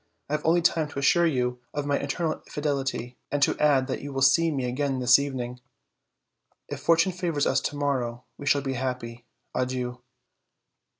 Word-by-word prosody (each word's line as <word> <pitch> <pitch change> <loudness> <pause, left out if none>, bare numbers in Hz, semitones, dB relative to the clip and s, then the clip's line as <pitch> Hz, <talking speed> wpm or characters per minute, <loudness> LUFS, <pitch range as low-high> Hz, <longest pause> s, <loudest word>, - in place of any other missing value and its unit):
I - - 0
have 150 - -1
only 170 +2 +3
time 160 -2 +2
to 145 - -11
assure 170 +5 +4
you 125 -4 0 0.2
of 145 -1 -2
my 145 0 +1
eternal 160 +3 -2
fidelity, 135 -4 -2
and 145 - 0
to - - +3
add 145 -3 +4
that 130 - -4
you 145 - -6
will 135 -1 0
see 165 +5 +5
me 135 -5 -1
again 135 +3 -1
in - - -3
the 125 0 +6
evening. 125 -3 -4 1.1
If - - -6
fortune 165 +2 +3
favors 170 -5 -1
us - - +2
to 145 - -3
morrow, 130 -4 -1
we 145 - -8
shall 145 -1 +3
be 135 -1 -2
happy. 120 -2 -4 0.3
Adieu." 125 -1 -2
140 Hz, 185 wpm, -26 LUFS, 125-150 Hz, 1.1 s, the